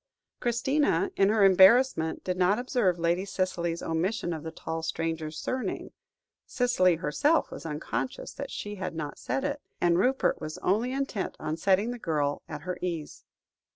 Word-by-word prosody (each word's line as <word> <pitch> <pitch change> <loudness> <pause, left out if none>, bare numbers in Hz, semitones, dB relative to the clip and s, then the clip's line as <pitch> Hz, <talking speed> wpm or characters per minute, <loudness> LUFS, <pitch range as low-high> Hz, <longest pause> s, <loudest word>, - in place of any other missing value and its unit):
Christina, 275 - +1
in 195 - +4
her 215 -1 +3
embarrassment, 190 -2 +5
did 185 - -1
not 185 +3 +3
observe 245 -8 +1
Lady 170 +2 +1
Cicely's 185 -3 -2
omission 175 +2 -1
of 160 - -5
the 160 - -5
tall 160 0 -5
stranger's 160 -1 -3
surname; 255 0 -3 0.6
Cicely 215 -8 +3
herself 285 - +1
was - - -7
unconscious 155 +11 -4
that 280 -1 -6
she 205 0 -6
had 185 -3 -4
not 150 -2 -5
said 270 - -2
it, 285 0 -2 0.2
and 175 0 +3
Rupert 260 +6 +2
was 155 0 -5
only 225 +7 +1
intent 270 -7 -2
on 155 - -2
setting 195 +6 +2
the 245 - -6
girl 145 -6 -1
at - - -6
her 180 0 -5
ease. 170 -4 -4
185 Hz, 160 wpm, -28 LUFS, 165-245 Hz, 0.6 s, embarrassment